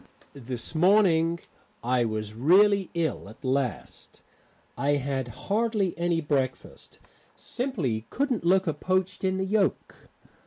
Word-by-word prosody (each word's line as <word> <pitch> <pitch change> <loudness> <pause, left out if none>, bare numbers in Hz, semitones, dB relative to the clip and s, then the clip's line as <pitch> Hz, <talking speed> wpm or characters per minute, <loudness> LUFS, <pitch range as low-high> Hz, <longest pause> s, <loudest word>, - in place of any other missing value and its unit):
This 125 -2 -5
morning 170 -2 +3 0.4
I 125 0 +1
was 110 -1 -4
really 190 - +4
ill 160 -11 -2
at 110 +6 -14
last; 130 -2 -3 0.5
had 140 -2 -1
hardly 205 - -1
any 170 -1 0
breakfast; 135 -4 -3 0.4
simply 155 - -3
couldn't 270 -7 -1
look 185 +3 +3
a 160 - 0
poached 185 +5 -1
in 190 0 +1
the 190 - -1
yolk. 200 0 -1
165 Hz, 115 wpm, -26 LUFS, 130-190 Hz, 0.5 s, really